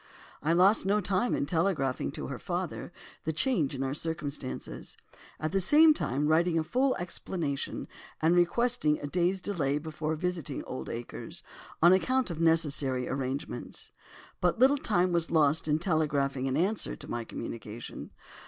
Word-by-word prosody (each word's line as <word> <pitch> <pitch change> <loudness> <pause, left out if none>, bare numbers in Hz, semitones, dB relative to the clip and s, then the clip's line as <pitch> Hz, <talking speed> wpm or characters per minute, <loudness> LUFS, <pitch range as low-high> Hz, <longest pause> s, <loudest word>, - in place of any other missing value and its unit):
I 155 - +1
lost 185 +6 +5
no 200 +2 +2
time 200 +4 +1
in - - 0
telegraphing 150 - 0
to - - -5
her - - -5
father - - -4 0.3
the 160 - -1
change 160 - +1
in 135 - -2
our 135 0 -1
circumstances, 150 -4 -5 0.4
at 155 - -2
the 195 - +1
same 305 - +7
time 145 - -1
writing 165 +2 +3
a 160 - +2
full 260 +10 +1
explanation 170 -4 -3 0.3
and 165 +2 +3
requesting 175 -2 +2
a - - -5
day's 180 +5 0
delay 150 -8 0
before 155 0 -3
visiting 175 -2 -3
Oldacres, 115 - -6 0.4
on 175 +2 +8
account 255 +3 +1
of 165 -1 -4
necessary 145 -6 +2
arrangements. 135 +1 -4 0.5
But - - +1
little 270 +4 +5
time 185 - +2
was 170 -1 +1
lost 155 -1 +3
in 150 0 +3
telegraphing 145 -6 0
an 135 +1 0
answer 195 +6 0
to - - -11
my 120 - -3
communication. 115 0 -7
160 Hz, 155 wpm, -29 LUFS, 140-185 Hz, 0.5 s, on